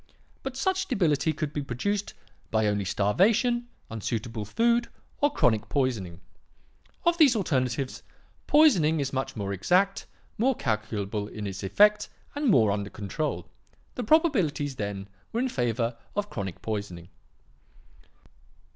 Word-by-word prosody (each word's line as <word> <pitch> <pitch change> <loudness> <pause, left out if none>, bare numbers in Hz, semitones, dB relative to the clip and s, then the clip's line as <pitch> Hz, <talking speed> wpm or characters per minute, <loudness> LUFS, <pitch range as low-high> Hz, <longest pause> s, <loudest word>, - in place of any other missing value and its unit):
But 265 -1 -5
such 380 +6 0
debility 160 - +2
could 155 -1 -4
be 145 - -2
produced 195 - -2 0.3
by 110 -1 +1
only 105 -1 0
starvation, 220 - +2 0.2
unsuitable 115 0 -3
food, 235 - +2 0.3
or 290 0 +3
chronic 110 - +1
poisoning. 110 - -1 0.8
Of 340 0 +3
these 280 -6 +6
alternatives, 130 - -1 0.5
poisoning 190 - +5
is 140 -1 -2
much 135 0 -2
more 100 -2 -3
exact, 185 - +1 0.3
more 260 +3 +3
calculable 105 - -2
in 105 -1 -7
its 95 -1 -5
effect 210 - +4 0.2
and 290 0 -1
more 110 - +5
under 100 0 -2
control. 105 +11 -4 0.5
The 250 - -4
probabilities, 195 - +2
then, 100 -1 -4 0.2
were 230 - -1
in 260 +1 0
favour 120 - -1 0.2
of 205 0 -2
chronic 95 -4 -5
poisoning. 100 -6 -4
135 Hz, 130 wpm, -27 LUFS, -, 0.8 s, these